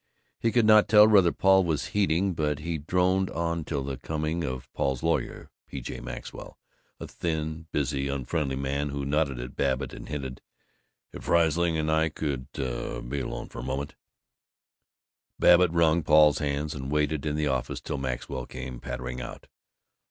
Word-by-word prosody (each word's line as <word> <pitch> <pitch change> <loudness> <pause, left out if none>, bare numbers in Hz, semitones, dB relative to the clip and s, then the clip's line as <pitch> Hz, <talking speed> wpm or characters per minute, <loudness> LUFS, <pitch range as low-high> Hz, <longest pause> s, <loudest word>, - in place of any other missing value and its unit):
He 115 - +1
could 120 -1 +3
not 110 -1 +6
tell 105 0 +8
whether 95 -6 +5
Paul 95 0 +4
was 80 -4 -1
heeding, 95 -2 +1
but 75 -3 -1
he 80 +2 -3
droned 90 +4 +1
on 85 0 -2
till 70 -2 -3
the 65 -1 -4
coming 80 +4 -2
of 65 -3 -4
Paul's 65 -2 -1
lawyer, - - -1 0.2
P. 70 - -6
J. - - -6
Maxwell, - - -8 0.4
a - - -6
thin, 80 -1 -3
busy, 70 -1 -1
unfriendly 70 +1 -2
man 70 +2 -2
who 70 0 -3
nodded 70 -3 0
at 60 +1 -7
Babbitt 65 -1 -1
and - - -9
hinted, 65 -3 -5 0.7
"If - - -9
Riesling 85 0 +3
and 80 0 0
I 80 0 +2
could 70 -4 -4
be 60 +1 -4
alone - - -5
for - - -9
a - - -5
moment 70 +3 -3 0.8
" - - -63
Babbitt 90 0 +6
wrung 85 0 +3
Paul's 75 -1 +5
hands, 75 0 -2
and 70 -2 -6
waited 75 -1 0
in 75 -1 -1
the 75 0 0
office 65 -3 -1
till - - -4
Maxwell 65 0 -4
came 65 -1 -7
pattering 65 +1 -5
out. - - -8
75 Hz, 170 wpm, -27 LUFS, 70-85 Hz, 0.8 s, tell